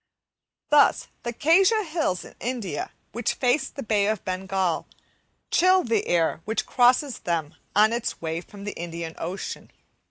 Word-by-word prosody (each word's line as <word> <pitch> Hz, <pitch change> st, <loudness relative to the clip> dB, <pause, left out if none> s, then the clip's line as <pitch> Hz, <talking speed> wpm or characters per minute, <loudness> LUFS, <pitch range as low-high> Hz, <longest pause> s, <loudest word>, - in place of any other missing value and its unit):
Thus 295 Hz, -1 st, +4 dB
the 240 Hz, -, -3 dB
Khasia 375 Hz, -, +4 dB
Hills 310 Hz, -, -1 dB
in -, -, -13 dB
India 230 Hz, -, -3 dB, 0.2 s
which 235 Hz, +1 st, -1 dB
face 265 Hz, +2 st, +1 dB
the 275 Hz, -, -7 dB
Bay 205 Hz, -2 st, +2 dB
of 215 Hz, -2 st, -1 dB
Bengal, 185 Hz, -2 st, -1 dB, 0.6 s
chill 370 Hz, +1 st, +5 dB
the 230 Hz, -3 st, 0 dB
air 165 Hz, -2 st, +1 dB
which 220 Hz, +2 st, -2 dB
crosses 250 Hz, +1 st, +3 dB
them 165 Hz, -3 st, -2 dB, 0.2 s
on 215 Hz, +2 st, +5 dB
its 235 Hz, 0 st, -2 dB
way 165 Hz, 0 st, -3 dB
from 200 Hz, +2 st, -12 dB
the 205 Hz, -, -4 dB
Indian 170 Hz, -1 st, -6 dB
Ocean. 185 Hz, +4 st, -5 dB
215 Hz, 150 wpm, -25 LUFS, 180-260 Hz, 0.6 s, chill